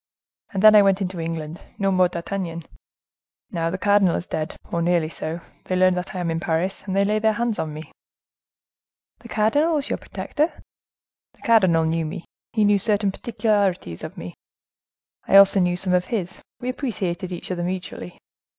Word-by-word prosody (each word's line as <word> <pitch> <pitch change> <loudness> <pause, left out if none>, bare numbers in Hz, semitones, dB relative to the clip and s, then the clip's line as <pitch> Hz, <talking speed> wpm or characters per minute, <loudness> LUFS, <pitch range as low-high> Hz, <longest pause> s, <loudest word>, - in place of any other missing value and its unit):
And 195 -2 -2
then 215 0 +9
I 210 - +8
went 195 -1 +3
into 185 -2 -3
England—no 165 +4 -4
more 185 -1 +4
D'Artagnan. 170 -1 -4 0.9
Now, 165 -1 -1
the 185 - -3
cardinal 200 -2 +3
is - - -3
dead, 155 -3 -4 0.2
or 170 - 0
nearly 170 -2 +1
so, 165 +1 -5 0.2
they 185 - -1
learn 185 0 +4
that 180 +1 -4
I - - -2
am 170 -2 -1
in 165 - -1
Paris, 170 +4 -1
and 190 - -2
they 200 0 +3
lay 210 +1 +1
their 220 0 +2
hands 235 0 -1
on 155 - -2
me." 155 +1 -9 1.3
"The 235 0 -13
cardinal 285 +11 +2
was 290 - -1
your - - 0
protector?" 310 +3 -3 0.7
"The - - -28
cardinal 185 -8 +4
knew 165 0 0
me; 175 +2 -7 0.3
he 215 -2 +2
knew 205 -1 +4
certain 205 -1 +1
particularities 200 - -1
of - - -7
me; 85 +1 -7 0.9
I - - +3
also 195 0 +7
knew 180 -1 +2
some 180 +1 -1
of 180 0 +2
his; 190 -7 -3 0.2
we 250 - -4
appreciated 190 -9 -3
each 175 +1 -5
other 175 -1 -2
mutually. 180 - -5
185 Hz, 180 wpm, -23 LUFS, 170-205 Hz, 1.3 s, then